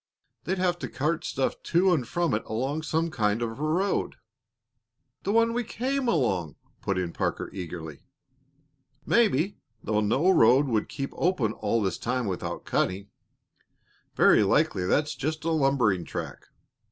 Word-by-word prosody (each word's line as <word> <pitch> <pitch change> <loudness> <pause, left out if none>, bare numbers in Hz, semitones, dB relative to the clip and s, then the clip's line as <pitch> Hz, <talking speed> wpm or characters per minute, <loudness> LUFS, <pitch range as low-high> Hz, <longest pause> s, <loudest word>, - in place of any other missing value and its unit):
They'd 190 +2 -1
have 180 -1 0
to - - -5
cart 155 +4 -1
stuff 135 - -2
to 180 +2 +3
and 130 -8 0
from 175 -1 0
it 105 - 0
along 135 +8 -2
some 160 +1 -1
kind 105 -5 +1
of 115 - -2
a - - -3
road 180 +6 0 0.5
" - - -52
"The 200 - +1
one 230 +1 +3
we 245 +1 0
came 260 +4 -2
along!" 95 - 0 0.3
put 100 -1 -1
in 90 -2 -2
Parker, - - -2
eagerly. 80 -5 -7 1.0
"Maybe, 200 - +2 0.3
though 105 -1 0
no 135 - +3
road 130 -2 +5
would 115 -5 -1
keep 135 0 -4
open 140 - +1
all 110 +1 0
this 95 - -2
time 125 0 -1
without 95 -3 -4
cutting. 100 +2 -1 1.0
Very - - +5
likely 90 -1 +2
that's 150 +7 +1
just 155 +4 -3
a 165 - 0
lumbering 135 - +2
track. 75 - -7
135 Hz, 155 wpm, -27 LUFS, 105-175 Hz, 1.0 s, road